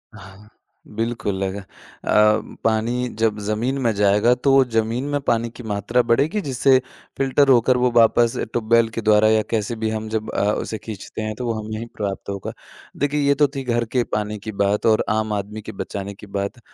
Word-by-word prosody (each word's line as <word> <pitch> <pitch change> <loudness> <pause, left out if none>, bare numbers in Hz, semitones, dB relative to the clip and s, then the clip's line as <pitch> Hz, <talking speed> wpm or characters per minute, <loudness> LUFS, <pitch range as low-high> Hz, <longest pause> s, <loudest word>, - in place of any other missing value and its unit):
हाँ, 100 0 -14 0.5
बिल्कुल 110 -4 -2
अग 95 0 -3
अ, 100 - -7 1.0
पानी 115 +3 0
जब 110 -2 +1
ज़मीन 110 +6 -1
में 120 -3 +2
जाएगा 105 +4 +4
तो 135 +1 +4
ज़मीन 115 +1 -1
में 145 0 0
पानी 115 -2 0
की 120 +2 -12
मात्रा 110 +3 0
बढ़ेगी, 140 - +1
जिससे 135 - +3 0.4
फ़िल्टर 135 +1 +2
होकर 125 0 +4
वो 125 0 +2
वापस 115 0 +4
ट्यूबवेल 115 0 +2
के 115 0 -5
द्वारा 110 0 +4
या 110 0 +4
कैसे 110 0 -1
भी 110 0 -2
हम 110 0 -3
जब 110 0 -3
अ, - - -1
उसे 110 - -3
खींचते 110 0 -8
हैं 110 0 -3
तो 125 - -4
वो 115 - 0
हमें 110 0 -5
ही 115 - -5
प्राप्त 100 -2 -4
होगा। 100 -1 -5 0.4
देखिए, 145 +1 0
ये 140 - +5
तो 145 +1 +4
थी 135 - -3
घर 120 -2 0
के 120 +2 0
पानी 105 0 -1
की 110 +2 -6
बात 100 +1 0
और 110 -1 +4
आम 110 0 0
आदमी 105 +2 -4
के 110 - -8
बचाने 100 0 -6
की 100 +1 -13
बात। 100 +4 -4
110 Hz, 195 wpm, -21 LUFS, 105-120 Hz, 1.0 s, ये